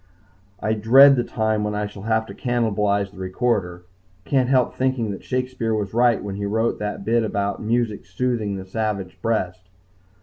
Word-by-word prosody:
I 110 - 0
dread 130 +6 +7
the 120 - +1
time 110 -2 -1
when 105 0 -2
I 105 0 -1
shall 105 -1 -9
have 110 +1 0
to - - -10
cannibalize 105 -5 0
the 95 - -14
recorder. 95 -2 -1 0.4
Can't 130 -3 +1
help 130 -2 +2
thinking 130 -4 -1
that 100 - -7
Shakespeare 125 -3 -2
was 105 -2 -3
right 120 0 +3
when 100 -1 -5
he 100 - -3
wrote 110 +3 0
that 105 -1 -4
bit 115 +2 +2
about 100 -2 -2
music 110 -4 -1
soothing 110 +1 -1
the 95 -1 -6
savage 95 -2 -3
breast. 95 -5 -1
110 Hz, 175 wpm, -22 LUFS, 100-120 Hz, 0.4 s, dread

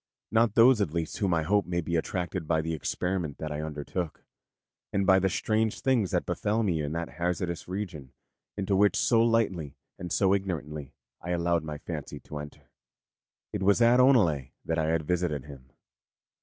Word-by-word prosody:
Not 110 -1 +3
those, 120 -1 +6
at 85 -5 -1
least, 80 +3 -3
whom 100 -4 +1
I 80 - +1
hope 100 +3 +1
may 85 -1 -1
be 85 0 -2
attracted 90 0 -2
by 80 -1 +2
the 80 +1 -3
experiment 85 -1 -2
that 80 -1 -5
I 75 0 -3
undertook, 80 +2 -4 0.7
and 100 0 +1
by 95 0 +6
the 95 0 +1
strange 110 +2 0
things 120 -8 +2
that - - 0
befell 110 +2 0
me 85 -6 0
in 75 +1 -3
that 85 0 -2
hazardous 85 0 -2
region 90 -8 -5 0.5
into 100 0 0
which 100 +1 +4
so 115 -2 +3
lightly 105 -11 +1 0.2
and 90 -2 -6
so 95 -1 +3
ignorantly 75 -7 -3 0.3
I 85 - -7
allowed 85 -1 +1
my 75 -1 -5
fancy - - -6
to 75 - -7
enter. 75 0 -11 0.8
It - - -2
was 100 +3 +4
at 120 +1 +5
Oneleigh 100 - +4 0.2
that 80 0 0
I 80 - +1
had 80 0 +1
visited 85 -5 -1
him. 65 -3 -12
90 Hz, 185 wpm, -28 LUFS, 80-100 Hz, 0.8 s, those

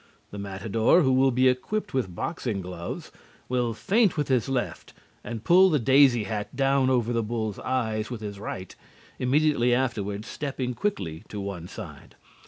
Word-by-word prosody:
The 100 - -7
matador, 105 - +2
who 130 -2 +3
will 135 +1 +4
be 130 +1 +3
equipped 180 +11 -1
with 105 -10 -1
boxing 120 - -3
gloves, 90 -2 -6 0.4
will 120 -3 0
feint 205 - +2
with 145 -2 -1
his 130 -2 +1
left 120 -10 -3 0.3
and 115 -2 -6
pull 185 +2 +6
the 155 - +3
daisy 130 -2 +5
hat 105 +2 -4
down 135 0 +2
over 120 -2 +1
the 115 - +1
bull's 110 -2 -3
eyes 110 -4 -1
with 120 -3 -6
his 100 -2 -6
right, 95 -2 -6 0.4
immediately 130 -2 +3
afterward 105 -5 -2
stepping 135 -4 -4
quickly 95 - -3
to 105 - -5
one 100 -4 -5
side. - - -10
120 Hz, 165 wpm, -26 LUFS, 105-135 Hz, 0.4 s, pull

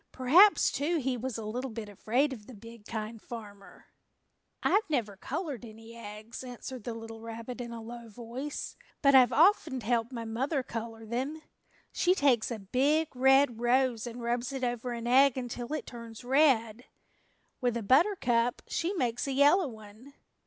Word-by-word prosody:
Perhaps, 335 +11 +5
too, 320 +5 0
he 265 -3 -1
was 250 0 -4
a 220 - -6
little 250 +5 -3
bit 225 -2 -6
afraid 240 +8 0
of 210 -5 -11
the 255 - -11
big 230 0 -13
Kind 220 0 -5
Farmer. 205 -4 -11 0.8
"I 410 - +4
never 230 -9 -1
colored 280 - -5
any 225 0 -12
eggs," 215 +1 -9
answered 250 -1 -8
the 235 - -4
little 225 0 -9
rabbit 230 +2 -7
in 235 -1 -6
a 230 -1 -7
low 235 0 -9
voice, 245 +6 -6 0.3
"but 275 -1 +6
I've 255 -3 +7
often 325 -5 +4
helped 230 +2 0
mother 250 +4 -2
color 225 -2 -6
them. 265 +8 -3 0.5
She 360 +1 +2
takes 265 - +3
a 235 - -3
big 275 +9 +1
red 265 -2 +4
rose 245 -1 +2
and 240 0 -7
rubs 240 +2 -1
it 265 -1 -5
over 245 0 -2
an 235 0 -5
egg 265 +2 +5
until 245 0 -5
it 310 - -3
turns 230 -1 -10
red. 250 -4 +2 0.8
With 245 -2 +1
a 230 - -4
buttercup 245 - +2
she 340 +4 -1
makes 245 -5 -1
a 275 - -1
yellow 290 +6 +5
one. 220 +4 -13
240 Hz, 165 wpm, -30 LUFS, 225-270 Hz, 0.8 s, I've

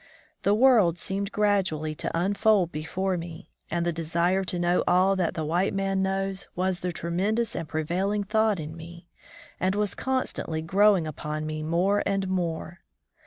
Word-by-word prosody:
The 200 +2 +3
world 220 -8 +5
seemed 195 +3 -3
gradually 190 -7 +1
to 165 - -3
unfold 200 -1 +2
before 185 +5 -2
me, 170 +1 -8 0.2
and 170 +1 -1
the 170 - 0
desire 170 +4 0
to 180 - -1
know 175 +1 +2
all 185 +2 +4
that 180 -4 -1
the 160 - -2
white 175 +6 0
man 195 0 0
knows 195 0 -2
was 185 0 0
the 180 - -2
tre 170 0 -5
mendous 215 +6 0
and 160 - -4
prevailing 185 +7 -1
thought 215 -1 +1
in 155 +1 -6
me, 170 +1 -11 0.5
and 190 +1 +1
was 205 -2 0
constantly 255 -11 -2
growing 195 +1 +4
upon 155 0 -4
me 155 0 -4
more 175 +6 +1
and 195 -1 0
more. 175 -2 -3
185 Hz, 165 wpm, -26 LUFS, 165-195 Hz, 0.5 s, world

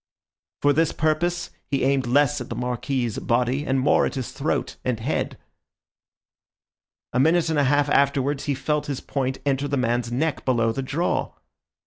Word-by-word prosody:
For 145 0 +5
this 160 +2 +2
purpose, 170 +3 0 0.2
he 135 -1 0
aimed 135 -2 +2
less 145 +2 +3
at 125 - -7
the - - -4
Marquis's 125 -1 -2
body, 125 +4 0
and 135 0 +2
more 130 - +3
at - - -6
his 130 -3 -4
throat - - -2
and 125 -3 -1
head. 125 +7 -2 1.8
A 125 - +2
minute 160 +3 +3
and 155 - +1
a 145 - +3
half 145 +2 +3
afterwards 140 0 +1
he 145 - 0
felt 150 +2 -1
his 140 -3 -3
point 130 -1 -2
enter 140 0 +1
the 140 0 -1
man's 120 -1 0
neck 150 +5 -1
below 115 -3 +2
the 135 - -3
jaw. 150 +6 -1
135 Hz, 170 wpm, -24 LUFS, 125-145 Hz, 1.8 s, For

